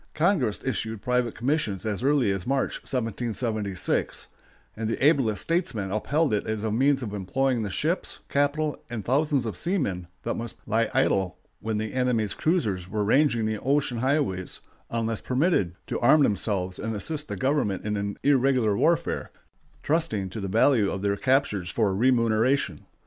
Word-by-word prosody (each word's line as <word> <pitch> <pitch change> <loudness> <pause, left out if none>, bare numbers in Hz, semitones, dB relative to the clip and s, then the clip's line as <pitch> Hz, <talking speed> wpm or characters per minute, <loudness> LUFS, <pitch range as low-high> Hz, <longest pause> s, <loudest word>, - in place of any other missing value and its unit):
Congress 155 - +2
issued 115 -4 -2
private 125 0 0
commissions 120 - -1
as 105 -1 -2
early 135 -5 +3
as 95 -2 -3
March, 135 0 0
1776, 115 -4 -2 0.5
and 110 0 -3
the 125 - 0
ablest 135 -9 +3
statesmen 115 - -1
upheld 145 +7 +1
it 105 - +1
as 110 -1 -2
a 110 - -1
means 135 +4 +2
of 105 -3 -5
employing 120 +6 0
the 105 - -2
ships, 155 - -1
capital, 145 +2 0
and 120 -3 -5
thousands 140 0 +1
of 110 -5 -3
seamen 115 - -1 0.2
that - - -1
must 115 -1 -5
lie 110 +1 +1
idle 95 -3 +2 0.2
when 110 0 -2
the 110 0 -3
enemy's 125 -5 +1
cruisers 105 - 0
were 105 +2 -1
ranging 120 0 +3
the 110 -1 -1
ocean 135 -2 0
highways 130 -9 -1 0.3
unless 115 -1 -2
permitted 125 - +1
to - - -3
arm 145 +5 +5
themselves 95 -5 0
and 110 +1 -3
assist 150 +8 -4
the - - -4
government 130 -9 0
in 105 0 -1
an 100 0 -3
irregular 130 -6 +3
warfare, 165 +8 +1 0.5
trusting 130 - 0
to 110 - -5
the 100 - -3
value 110 +1 +3
of 95 - -4
their 100 0 +1
captures 130 -7 +1
for 100 -1 +1
remuneration. 120 +2 +2
115 Hz, 160 wpm, -26 LUFS, 105-140 Hz, 0.5 s, arm